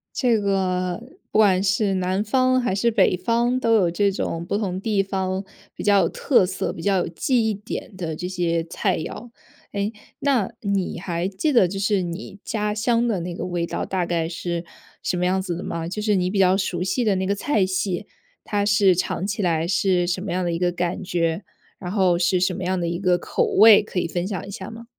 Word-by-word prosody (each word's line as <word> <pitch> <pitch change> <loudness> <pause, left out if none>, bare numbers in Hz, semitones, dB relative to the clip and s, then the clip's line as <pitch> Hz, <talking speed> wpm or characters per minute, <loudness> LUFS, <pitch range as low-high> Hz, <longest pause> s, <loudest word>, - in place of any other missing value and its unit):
这 240 -4 +2
个 185 -2 0 0.3
不 - - +2
管 195 -3 +4
是 205 -1 +1
南 185 +2 0
方， 255 +3 +2
还 190 -6 0
是 235 +4 +2
北 195 -4 +3
方， 235 +6 +1
都 230 -2 +2
有 195 -6 +4
这 200 +4 +1
种 170 -3 -3
不 200 - -2
同 190 -4 -2
地 205 0 +1
方 190 -1 -2 0.3
比 - - -7
较 200 -1 +5
有 - - +1
特 255 -9 +3
色、 185 +1 -3
比 165 - -8
较 195 0 +2
有 - - -1
记 225 +7 +1
忆 215 - -1
点 200 0 -7
的 165 -4 -3
这 180 +3 -5
些 170 -2 0
菜 165 - -1
肴。 230 +9 -7 0.4
诶， 200 +1 -1 0.3
那 265 -8 +1
你 200 -4 -1
还 175 0 -2
记 195 +11 -1
得 235 -9 +5
就 195 +2 -5
是 200 -1 +1
你 175 +3 -6
家 210 -1 -1
乡 235 +2 +1
的 205 -6 0
那 175 +1 -4
个 - - -4
味 175 -2 -2
道 - - -3
大 185 -2 -1
概 170 -1 -1
是 170 0 -3 0.4
什 180 - -1
么 180 - 0
样 190 +1 +1
子 180 -2 -3
的 175 - -6
吗？ 165 -1 -4
就 185 +5 -5
是 210 0 +1
你 180 -1 +1
比 200 - -2
较 190 -1 +5
熟 185 -2 -1
悉 190 +7 0
的 210 -4 +2
那 190 0 -1
个 200 - +1
菜 205 -1 +1
系， 185 0 -2 0.4
它 205 -1 -1
是 205 -2 +4
尝 185 +1 -1
起 205 +1 -2
来 165 -3 +1
是 180 0 +2
什 180 +1 -1
么 195 -2 -4
样 180 +1 -1
的 175 - 0
一 165 - -2
个 180 0 +1
感 175 0 -2
觉， 170 -1 -1 0.4
然 180 -2 -5
后 185 -4 +2
是 180 +1 +2
什 185 +1 +1
么 190 - -6
样 185 0 0
的 170 - -1
一 170 +1 -2
个 180 -2 +3
口 - - -1
味， 215 0 +7
可 205 - -8
以 170 - -1
分 175 +2 -2
享 195 -3 -4
一 - - -7
下 190 0 -7
吗？ 230 +1 -10
190 Hz, 250 characters per minute, -23 LUFS, 175-205 Hz, 0.4 s, 味